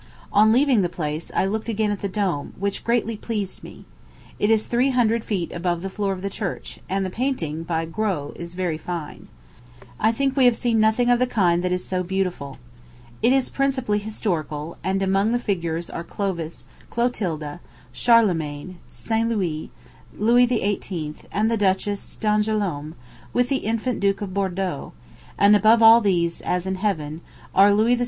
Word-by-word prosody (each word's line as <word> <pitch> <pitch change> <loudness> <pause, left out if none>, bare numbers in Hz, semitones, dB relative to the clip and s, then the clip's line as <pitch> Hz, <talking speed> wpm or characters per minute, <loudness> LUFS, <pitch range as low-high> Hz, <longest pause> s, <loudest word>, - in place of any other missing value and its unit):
On 215 +2 +6
leaving 255 -2 +4
the 175 - 0
place, 155 -2 -4
I - - +2
looked 215 +4 -2
again 215 -1 0
at 205 - -4
the 200 - -2
dome, 185 -7 -2
which 200 +1 -2
greatly 230 -1 0
pleased 210 -3 -4
me. - - -12 0.5
It 205 - +2
is 220 -1 +3
three 245 +3 +2
hundred 235 -3 +2
feet 185 -6 -2
above 175 0 -2
the 195 - -4
floor 200 0 -1
of 190 -1 -5
the 200 - -1
church; 195 -4 -5
and 195 +1 0
the 185 - -4
painting, 180 - -2
by 165 -1 -2
Gros, 170 -4 -2
is 170 0 -8
very 175 -4 -2
fine. 170 -3 -6 0.7
I 220 - +3
think 270 +3 0
we 265 -2 +4
have 245 -2 +5
seen 235 -2 +1
nothing 220 +3 +3
of 245 - +4
the 255 - +2
kind 175 -7 +2
that 180 - 0
is 180 0 -1
so 185 -1 -1
beautiful. 180 -7 -3 0.6
It 235 - +4
is 265 -1 +2
principally 260 -6 0
historical; 170 -7 -3
and 190 +2 0
among 195 +4 +2
the - - +3
figures 170 -7 -2
are 170 - -6
Clovis, 170 -3 -4 0.2
Clotilda, 175 -11 -2 0.3
Charlemagne, 180 -7 +2
St. 225 0 -1
Louis, 175 -9 -2 0.5
Louis 240 +4 +4
XVIII., 195 -9 -2 0.2
and 215 +3 +1
the 230 - +1
Duchess 200 0 -1
d'Angoulême, 210 -8 0 0.4
with 245 0 +2
the 275 - +2
infant 230 +2 -2
Duke 200 0 +1
of 190 -2 -6
Bourdeaux; 190 -1 -2 0.4
and 200 +1 +6
above 220 +2 +5
all 225 +1 +9
these, 175 -5 +1
as 180 0 -1
in 190 0 -2
heaven, 165 -6 -2 0.3
are 200 +2 +6
Louis 220 +4 +3
XVI. - - -4
200 Hz, 175 wpm, -23 LUFS, 175-225 Hz, 0.7 s, all